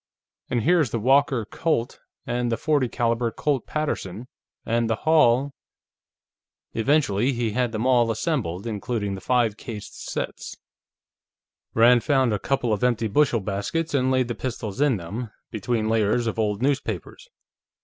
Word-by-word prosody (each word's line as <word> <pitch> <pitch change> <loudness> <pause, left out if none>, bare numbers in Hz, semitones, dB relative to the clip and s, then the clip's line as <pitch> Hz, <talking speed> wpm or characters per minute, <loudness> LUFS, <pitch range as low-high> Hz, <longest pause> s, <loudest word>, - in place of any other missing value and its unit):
"And 120 -3 0
here 175 +4 +4
is 150 -7 +2
the 115 - -2
Walker 130 0 +3
Colt, 135 0 -1 0.3
and 120 -1 -1
the - - +2
.40 145 -3 0
caliber 115 -1 0
Colt 135 +1 -1
Paterson, 120 -8 -3 0.4
and 115 0 0
the 110 - +2
Hall...." 140 -4 +4 1.2
Eventually, 125 -1 +2
he 120 -2 -1
had 125 +1 0
them 110 +1 -2
all 120 -3 +4
assembled, 115 - -2
including 105 -2 -3
the 95 - -6
five 120 -1 +1
cased 110 -3 -8 0.2
sets. - - -5 1.2
Rand 120 +1 +6
found 130 -5 +2
a 105 - -1
couple 125 -3 0
of 105 - -2
empty 120 -2 +2
bushel 120 0 +2
baskets 105 +12 -2
and 130 -2 +2
laid 130 -1 +2
the 120 - -2
pistols 115 -2 -5
in 145 -6 +3
them, 105 +7 -6 0.2
between 110 0 -1
layers 110 +1 +2
of 115 0 -2
old 105 +1 0
newspapers. 145 - -2
120 Hz, 150 wpm, -24 LUFS, 110-135 Hz, 1.2 s, Rand